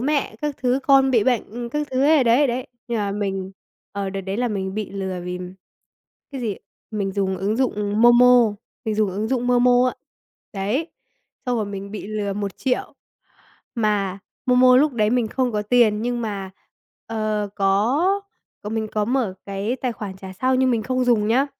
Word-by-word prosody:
mẹ 285 +2 0
các 295 -2 -2
thứ, 255 +1 +1
con 270 -1 +5
bị 230 -5 +3
bệnh 240 -1 -1
các 295 +3 -2
thứ 260 0 0
ấy, 300 -2 +5
đấy, 245 +5 +4
đấy. 250 +1 -2 0.2
Nhưng 235 -1 -1
mà 205 -1 -1
mình, 195 -2 -3 0.4
ờ, 200 -1 -3
đợt 195 0 -4
đấy 195 +1 -4
là 245 +1 0
mình 190 -3 -3
bị 215 -1 -4
lừa 190 -2 -4
vì 180 0 -4 0.9
cái 270 - -5
gì? 210 -5 -2 0.3
Mình 200 -3 -2
dùng 190 -1 -1
ứng 205 +3 -1
dụng 210 -5 0
MoMo, 240 -2 +6 0.3
mình 220 -2 -1
dùng 210 -2 +1
ứng 210 +4 -3
dụng 250 -2 0
MoMo 245 0 +4
á, - - -4 0.6
đấy, 215 - -1 0.6
xong 250 -1 +1
rồi 215 -2 -1
mình 200 0 -6
bị 210 -1 -6
lừa 210 -1 -2
1.000.000. 205 +6 -2 0.8
Mà 205 -4 0 0.3
MoMo 250 0 +6
lúc 290 +2 +4
đấy 215 -3 +1
mình 240 -2 +1
không 250 +1 -1
có 210 -1 -1
tiền, 215 -1 +3
nhưng 240 0 -1
mà, 200 -3 -4 0.6
ờ, 215 -2 -2
có 205 - +2 0.7
mình 220 -1 -2
có 210 -1 +1
mở 240 -4 0
cái 200 +5 -2
tài 255 -1 -2
khoản 205 -4 -7
trả 190 0 -9
sau 255 +7 0
nhưng 260 0 +3
mình 230 -3 +1
không 255 +2 0
dùng 225 -4 +2
nhá, 260 +5 +3
220 Hz, 185 wpm, -22 LUFS, 200-250 Hz, 0.9 s, MoMo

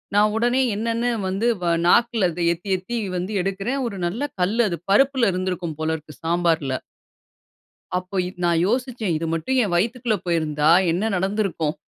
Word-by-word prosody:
நான் 210 +1 +4
உடனே 245 +3 +2
என்னென்னு 230 +2 -1 0.2
வந்து 195 +5 0
வ - - -2 0.2
நாக்கில 230 -3 +4
அதை 175 +2 -5
எத்தி 175 +4 -9
எத்தி 235 +6 -5 0.2
வந்து 185 +4 -3
எடுக்கிறேன், 195 +8 -2
ஒரு 200 -4 -6
நல்ல 220 +10 -4 0.2
கல்லு 220 +6 +2
அது. 170 - -3
பருப்பில 260 -2 +4
இருந்திருக்கும் 180 -4 -3
போல 160 0 0
இருக்கு, 150 -2 -14
சாம்பாருல. 165 -5 +1 1.2
அப்போ, 185 +2 -6
இது 185 0 -10
நான் 170 -1 +2
யோசிச்சேன், 240 -5 -1
"இது 165 - -3
மட்டும் 260 +12 -1
என் 185 -4 -2
வயித்துக்குள்ள 230 +3 0
போயிருந்தா 155 -2 +1 0.2
என்ன 180 +5 -1
நடந்திருக்கும்?" 190 -5 -1
195 Hz, 155 wpm, -22 LUFS, 170-230 Hz, 1.2 s, நான்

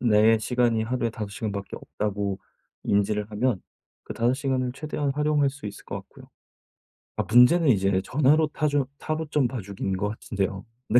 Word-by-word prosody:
내 110 -1 +5
시간이 120 -1 +1
하루에 120 0 -1
5 105 -2 -5
시간밖에 100 -3 -5
없다고 100 -2 -3 0.4
인지를 105 +1 0
하면 110 -1 0 0.4
그 - - -7
5 120 +2 +1
시간을 130 -2 -1
최대한 145 0 -3
활용할 150 -1 +2
수 140 -4 -8
있을 100 - -8
것 - - -6
같고요. - - -17 0.9
아 - - 0
문제는 130 +7 +5
이제 95 -3 +3
전화로 150 +3 +3
타조 145 -2 0
타로점 155 -4 -1
봐주기인 100 -5 -4
것 105 +2 -1
같은데요. 100 -2 -3 0.2
네. 120 - +6
120 Hz, 330 characters per minute, -25 LUFS, 105-140 Hz, 0.9 s, 네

